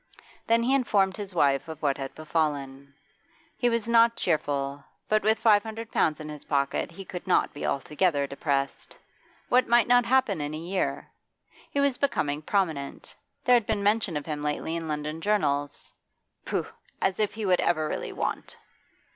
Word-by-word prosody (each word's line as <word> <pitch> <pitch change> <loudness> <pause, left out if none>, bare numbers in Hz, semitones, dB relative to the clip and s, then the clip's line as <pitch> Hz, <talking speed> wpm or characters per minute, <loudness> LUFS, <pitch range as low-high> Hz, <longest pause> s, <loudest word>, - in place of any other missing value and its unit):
Then 230 +1 +3
he 255 +3 +2
informed 200 -8 +2
his 200 -3 -7
wife 140 -3 +2
of 160 -2 -7
what 140 -2 +1
had 135 -1 -6
befallen. 140 -3 -2 0.6
He 245 - +1
was 230 -1 -1
not 230 0 +5
cheerful, 145 -4 -1 0.2
but 215 0 +2
with 220 +2 +3
five 215 -2 +5
hundred 225 +1 -7
pounds 155 -2 +1
in 155 - -7
his 150 -1 -8
pocket 140 -2 0
he 195 +3 -9
could 180 +1 -7
not 185 - +2
be 145 - -4
altogether 145 +1 0
depressed. 140 0 -3 0.5
What 250 0 +4
might 240 0 +4
not 245 0 +5
happen 245 - +2
in 145 +1 -3
a - - -4
year? 180 +4 -3 0.6
He 285 - -2
was 280 -3 +2
becoming 150 - 0
prominent; 160 -6 -2 0.3
there 250 - +5
had 235 -3 +2
been 205 -2 0
mention 205 -5 +1
of 145 - -5
him 150 -2 -4
lately 150 +2 -2
in 165 -1 -4
London 150 +1 -3
journals. 145 -9 -1 0.5
Pooh! - - -1 0.3
as 190 +1 0
if 210 -1 0
he 220 -1 -3
would 185 -2 +3
ever 155 -2 +1
really - - -4
want! - - -4
170 Hz, 175 wpm, -27 LUFS, 145-220 Hz, 0.6 s, not